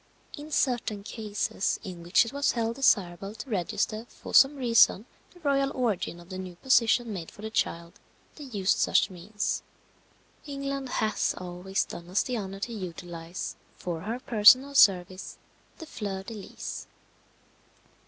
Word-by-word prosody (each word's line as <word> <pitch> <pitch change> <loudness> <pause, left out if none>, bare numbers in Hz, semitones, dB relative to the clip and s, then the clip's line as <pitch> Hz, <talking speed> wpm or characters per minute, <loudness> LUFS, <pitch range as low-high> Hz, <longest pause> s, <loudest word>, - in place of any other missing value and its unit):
In 295 +1 -9
certain 240 -8 0
cases 210 -2 -2
in 180 -3 -7
which 175 +7 +4
it 230 - -7
was 280 0 +1
held 230 0 -1
desirable 195 -6 +2
to 260 - -8
register 215 +4 -1
for - - -11
some 275 +2 +7
reason 230 -5 +4 0.3
the 355 - -18
royal 275 -2 +1
origin 215 -8 -1
of 175 +1 -15
the 185 -1 -6
new 185 -2 -7
position 235 +1 +3
made 170 -4 -6
for 205 - -14
the 220 - -5
child, 170 -5 -2 0.4
they 295 - -9
used 205 -7 0
such 195 - +3
means. 200 +4 -3 0.9
England 275 -1 -4
has 220 -3 0
always 180 +2 -2
done 170 0 -9
us 190 +3 +2
the 250 - -3
honour 195 -3 -5
to 235 - -3
utilize, 175 -3 -6 0.2
for 170 -2 -4
her 225 +6 -3
personal 255 +3 +6
service, 185 -6 +3 0.4
the 325 - -8
fleur 200 -9 -5
de 225 - -8
lis. 205 -3 -7
210 Hz, 155 wpm, -28 LUFS, 185-250 Hz, 0.9 s, some